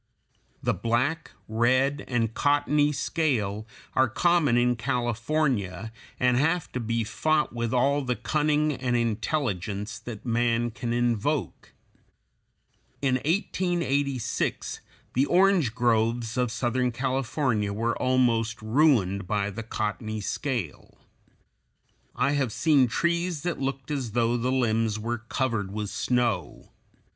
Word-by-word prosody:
The - - +2
black, 130 +8 0 0.2
red, 130 +5 +2
and 115 -3 0
cottony 145 +1 +2
scale 115 -9 -1 0.3
are 130 -1 +3
common 160 -2 +3
in 125 0 +3
California, 120 - -1 0.3
and 125 -1 +3
have 165 +5 +1
to 125 - -3
be 115 0 -1
fought 150 +9 0
with 115 -1 -2
all 140 +3 +2
the 125 -2 -1
cunning 150 +1 +1
and 125 -2 -1
intelligence 110 - -2
that 115 -1 -8
man 120 0 +1
can 120 +1 -4
invoke. 120 +4 -1 1.3
In 130 -2 +3
1886 145 - -1 0.3
the 135 +3 +2
orange 180 - +3
groves 115 -1 +1
of 125 -3 0
southern 125 +1 0
California 130 -3 -1
were 115 +3 -1
almost 120 -3 +2
ruined 110 - +2
by 105 0 0
the 110 +4 -6
cottony 110 0 -3
scale. 115 - -4 1.2
I - - +2
have 140 -5 0
seen 140 0 +3
trees 170 +3 -1
that 175 -1 -2
looked 135 +1 -3
as 130 -7 -3
though 120 0 +2
the 125 +2 0
limbs 115 -4 +1
were 115 +2 -3
covered 115 -4 -2
with 105 0 -4
snow. 120 - -1
120 Hz, 120 wpm, -26 LUFS, 115-140 Hz, 1.3 s, are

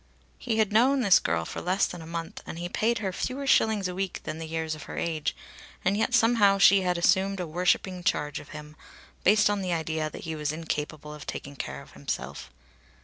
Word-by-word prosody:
He 225 -3 -1
had 215 -2 +2
known 260 +5 +4
this 200 -6 +6
girl 80 0 -1
for - - -6
less 185 +3 +2
than 175 - -7
a 160 - -10
month 165 0 -5
and - - -6
he 175 +1 -3
paid 230 +6 +1
her 195 -3 -3
fewer 265 +7 -3
shillings 220 -7 +3
a 180 - -4
week 190 0 -3
than 155 - -5
the 165 - -5
years 160 0 -2
of 155 - -8
her - - -6
age, 160 -3 -1 0.5
and 195 +2 +3
yet 225 +4 +1
somehow 225 -4 +5
she 195 0 +6
had 180 -1 0
assumed 190 +3 +2
a 180 - -2
worshipping 180 +2 0
charge 150 -3 0
of - - -13
him, 150 0 -10 0.5
based 210 +2 +5
on 205 -1 0
the 180 -2 -1
idea 160 -1 -1
that - - -9
he 160 -1 -4
was 150 -1 -2
incapable 155 -1 -4
of 150 0 -10
taking 140 0 -6
care 125 - -6
of - - -18
himself. - - -5
180 Hz, 220 wpm, -27 LUFS, 155-205 Hz, 0.5 s, this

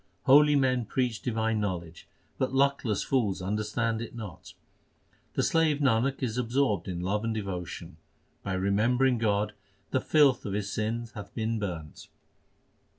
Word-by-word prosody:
Holy 145 +2 +6
men 130 -3 +2
preach 120 0 -1
divine 110 -2 0
knowledge, 85 -5 -4 0.3
but 130 - 0
luckless 135 -6 +2
fools 115 -8 0
understand 105 +4 -1
it 115 - -7
not. 105 -7 -9 0.8
The - - +1
slave 160 -3 +3
Nanak 135 -1 +1
is 120 -1 -1
absorbed 120 -6 0
in 90 -2 -3
love 100 +4 -1
and 115 -1 -1
devotion; 95 -5 -5 0.4
by 100 - -3
remembering 115 +7 +2
God 105 -1 +1 0.4
the - - +1
filth 145 -5 +4
of 100 - -4
his 100 0 -2
sins 115 +2 -2
hath 100 -1 -9
been 115 0 -1
burnt. 85 -7 -6
110 Hz, 145 wpm, -28 LUFS, 100-125 Hz, 0.8 s, Holy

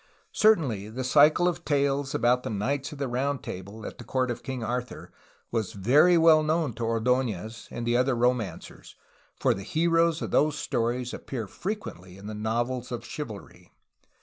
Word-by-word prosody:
Certainly 140 - +2
the 125 +4 -4
cycle 150 +6 +5
of 175 - -2
tales 140 -1 0
about 125 +1 +3
the - - -5
knights 110 +7 -2
of 150 - -8
the 140 -1 -2
round 130 +2 -1
table 100 +4 -8
at - - -8
the - - -7
court 130 -1 -1
of 120 - -5
King 130 -4 -5
Arthur 125 +2 -4 0.4
was 110 -4 -2
very 145 - +5
well 160 -1 +6
known 155 -3 0
to 115 - -5
Ord6nez 115 -2 -1
and 120 - -5
the 120 0 +1
other 130 0 +2
romancers, 120 -7 -2 0.4
for - - +3
the 95 - -6
heroes 165 - +1
of - - -4
those 150 0 +2
stories 120 0 -1
appear 120 -5 -5
frequently 95 - -6
in 100 - -12
the 110 - -5
novels 120 +4 -2
of 120 - -5
chivalry. 115 -10 -8
125 Hz, 175 wpm, -27 LUFS, 110-145 Hz, 0.4 s, well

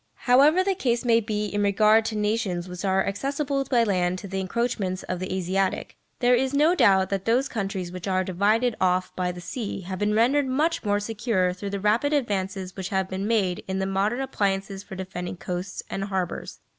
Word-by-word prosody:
However 285 +8 +5
the 390 0 +1
case 250 -9 -1
may 230 -1 +5
be 210 -1 -2
in 205 0 -2
regard 215 +2 +4
to 220 - -2
nations 210 -4 -1
which 180 +1 -7
are 190 -1 +2
accessible 275 +6 -1
by 245 -3 +3
land 185 -4 +1
to 200 - -8
the 190 0 -3
encroachments 190 -2 -2
of 180 - -4
the 185 - -4
Asiatic, 190 +1 -1 0.3
there 245 0 +5
is 260 +3 +1
no 305 +4 +4
doubt 190 - +4
that 195 -1 -2
those 250 +4 +2
countries 195 -5 -3
which 180 +1 -7
are 185 -1 +1
divided 210 +6 +1
off 185 0 +1
by 180 -1 -1
the 180 - -9
sea 200 +3 -5
have 185 0 -6
been 210 0 +1
rendered 265 +5 +3
much 310 +6 0
more 205 -1 +1
secure 205 -4 0
through 200 +2 -6
the 200 0 -3
rapid 225 +9 +2
advances 195 -8 -2
which 190 -1 -5
have 190 -1 0
been 190 +2 -3
made 195 -6 +1
in 190 0 -2
the 190 - 0
modern 200 +6 0
appliances 195 -6 -1
for 195 - -10
defending 185 -1 -5
coasts 180 +1 -5
and 195 - -3
harbours. 190 -3 -4
200 Hz, 205 wpm, -25 LUFS, 185-235 Hz, 0.3 s, However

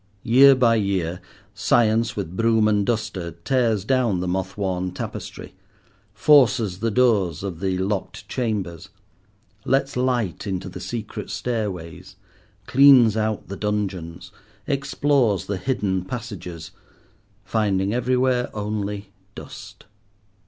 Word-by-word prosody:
Year 135 +3 +7
by 120 -3 +3
year, 95 -4 -1 0.3
Science 115 0 +2
with 95 -4 -5
broom 115 0 +3
and 105 -1 +2
duster 95 -6 -3
tears 115 -6 +1
down 120 -7 +1
the 90 - -3
moth 95 +1 -3
worn 95 -2 -2
tapestry, - - -7 0.6
forces 115 -4 +3
the 115 +1 0
doors 105 -8 +2
of 95 -5 -5
the 95 -1 -1
locked 100 +2 -3
chambers, 95 -7 -3 0.7
lets 135 +1 0
light 125 -7 -1
into 95 -1 -3
the - - -8
secret 115 -3 -6
stairways, 100 -9 -4 0.5
cleans 130 -5 +6
out 110 -1 -2
the 100 - -6
dungeons, 95 -5 -4 0.3
explores 135 -5 +1
the 100 - -3
hidden 95 -6 -1
passages—finding 100 0 -5
everywhere 125 0 +1
only 105 -1 -4 0.2
dust. - - -11
105 Hz, 110 wpm, -23 LUFS, 95-120 Hz, 0.7 s, Year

